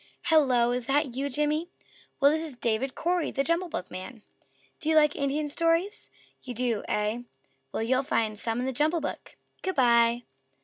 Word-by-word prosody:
"Hello! 260 Hz, -7 st, +4 dB
Is 245 Hz, -1 st, -2 dB
that 280 Hz, -2 st, +1 dB
you, 275 Hz, +3 st, -2 dB
Jimmy?" 300 Hz, +4 st, 0 dB, 0.5 s
"Well, 280 Hz, 0 st, +6 dB
this 315 Hz, +1 st, 0 dB
is 305 Hz, -5 st, -5 dB
David 240 Hz, +2 st, -1 dB
Cory, 350 Hz, 0 st, 0 dB
the 275 Hz, -, -1 dB
JUMBLE 335 Hz, +3 st, 0 dB
BOOKman. 185 Hz, -, -6 dB, 0.6 s
Do 315 Hz, -, -2 dB
you 320 Hz, -, +3 dB
like 300 Hz, -1 st, +5 dB
Indian 285 Hz, +2 st, -1 dB
stories? 335 Hz, +7 st, 0 dB, 0.3 s
You 250 Hz, -2 st, -7 dB
do, 235 Hz, -3 st, 0 dB
eh? 210 Hz, +3 st, -1 dB, 0.5 s
Well, -, -, -2 dB
you'll 255 Hz, +3 st, +2 dB
find 225 Hz, -6 st, 0 dB
some 225 Hz, +2 st, -2 dB
in 250 Hz, -, -1 dB
the 265 Hz, -, -2 dB
JUMBLE 310 Hz, +5 st, +1 dB
BOOK. 290 Hz, -, -6 dB, 0.2 s
Good 375 Hz, -1 st, -2 dB
by!" 235 Hz, -2 st, +4 dB
275 Hz, 175 wpm, -27 LUFS, 235-310 Hz, 0.6 s, Well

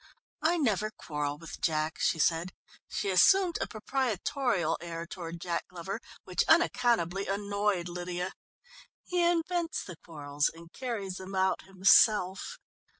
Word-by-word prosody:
"I 340 Hz, +3 st, +3 dB
never 215 Hz, -, +1 dB
quarrel 150 Hz, -7 st, -4 dB
with 165 Hz, +1 st, -10 dB
Jack," 155 Hz, 0 st, 0 dB
she -, -, +2 dB
said. 165 Hz, +3 st, +1 dB, 0.4 s
She 195 Hz, -, -1 dB
assumed 350 Hz, -, +5 dB
a -, -, 0 dB
proprietorial 225 Hz, -, -1 dB
air 170 Hz, -1 st, -5 dB
toward 170 Hz, -1 st, -7 dB
Jack 170 Hz, -1 st, -3 dB
Glover, 180 Hz, +2 st, -6 dB, 0.2 s
which 180 Hz, -, 0 dB
unaccountably 230 Hz, -, +3 dB
annoyed 200 Hz, -2 st, 0 dB
Lydia. 180 Hz, +1 st, -4 dB, 0.7 s
"He 355 Hz, -1 st, 0 dB
invents 340 Hz, 0 st, 0 dB
the 180 Hz, -4 st, -9 dB
quarrels 145 Hz, -3 st, -2 dB
and 165 Hz, +1 st, -15 dB
carries 210 Hz, -8 st, -4 dB
them 190 Hz, +1 st, -7 dB
out 190 Hz, -1 st, +1 dB
himself. 195 Hz, -, +4 dB
190 Hz, 130 wpm, -30 LUFS, 170-230 Hz, 0.7 s, assumed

